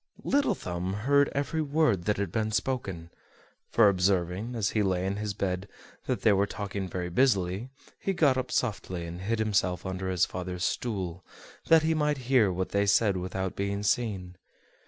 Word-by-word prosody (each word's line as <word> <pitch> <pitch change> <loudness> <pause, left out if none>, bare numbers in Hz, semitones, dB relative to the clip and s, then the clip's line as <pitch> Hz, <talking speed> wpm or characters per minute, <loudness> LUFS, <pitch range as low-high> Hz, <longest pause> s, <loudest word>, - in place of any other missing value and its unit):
Little 280 -7 +2
Thumb 90 - -4
heard 140 0 +4
every 145 +3 -1
word 145 - +1
that 105 - +1
had 100 -4 -2
been 110 +1 -1
spoken; 105 -7 -2 0.6
for 115 -3 +5
observing, 95 +3 +1
as 105 -4 0
he 110 - +1
lay 95 -2 0
in 100 +1 -1
his 105 -1 -3
bed, 95 0 -2 0.4
that - - -1
they 110 - +6
were 100 +1 +2
talking 100 -2 -4
very 90 0 -4
busily, 100 -1 +1 0.3
he 195 - -1
got 150 -7 +3
up 130 -1 -2
softly, 95 -7 -2
and 85 +2 -7
hid 115 +4 -1
himself 100 -5 0
under 95 0 -3
his 90 -1 +2
father's 90 -1 -5
stool, 95 -6 -2 0.4
that 165 -1 +6
he 160 +1 +2
might 150 -2 +1
hear 115 -8 +5
what 95 +1 -2
they 100 0 +1
said 100 0 +4
without 95 +1 -3
being 100 +1 -2
seen. 100 -5 -1
100 Hz, 175 wpm, -28 LUFS, 90-120 Hz, 0.6 s, they